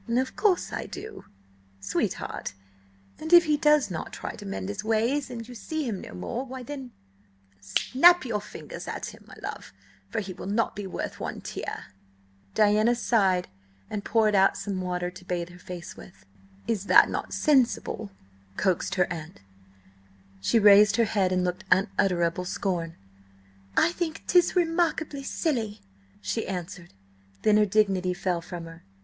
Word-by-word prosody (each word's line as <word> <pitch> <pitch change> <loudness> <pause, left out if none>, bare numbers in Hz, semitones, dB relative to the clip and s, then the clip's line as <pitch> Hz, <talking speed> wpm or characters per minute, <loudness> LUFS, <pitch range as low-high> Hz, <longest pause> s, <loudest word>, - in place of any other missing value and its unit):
"Of 255 +3 0
course 395 -4 +1
I - - -4
do, 430 0 -9 0.5
sweetheart! 95 - -3 0.7
And 315 +2 -6
if 345 0 +9
he 305 -1 +3
does 300 - +3
not 165 - -5
try - - -6
to 205 - -9
mend 195 0 -4
his 205 0 -4
ways, 230 +6 +1
and 230 -2 -7
you 250 - -9
see 315 +6 -4
him 205 -5 -3
no - - -9
more–why 250 - -5
then, 270 -1 -7 0.7
snap 265 - +4
your 215 -4 -1
fingers 210 - -9
at - - -5
him, - - -16
my - - -12
love, - - -6 0.4
for 225 - -2
he 195 -3 -5
will 180 - -8
not 220 +3 0
be 205 -1 -5
worth - - -5
one - - -4
tear!" - - -6 0.7
Diana 215 +3 +4
sighed 195 -7 +2 0.4
and 205 -1 -3
poured 220 -1 +2
out 195 -1 +4
some 195 -2 -3
water 180 -1 -2
to 180 0 -13
bathe 175 -1 -3
her 180 0 -14
face 175 -1 -8
with. 95 0 -14 0.4
"Is 205 -3 -1
not - - +7
that - - -3
sensible?" 250 -6 +1 0.5
coaxed 185 -3 0
her 180 -2 +3
aunt. 160 +1 -9 1.0
She 100 - +2
raised 205 -1 +7
her 230 - +3
head 195 -4 +1
and 185 0 +1
looked 180 +1 -2
unutterable 180 -2 +2
scorn. 175 -3 -2 0.8
"I - - +5
think 335 -2 -4
'tis 355 0 +4
remarkable 330 -4 0
silly," 230 -9 -2 0.4
she 95 -1 -2
answered. 180 -1 -6 0.5
Then 210 -1 +5
her 210 0 +4
dignity 190 -3 +2
fell 180 -2 -1
from 170 0 -7
her. 165 0 -12
205 Hz, 160 wpm, -27 LUFS, 180-255 Hz, 1.0 s, if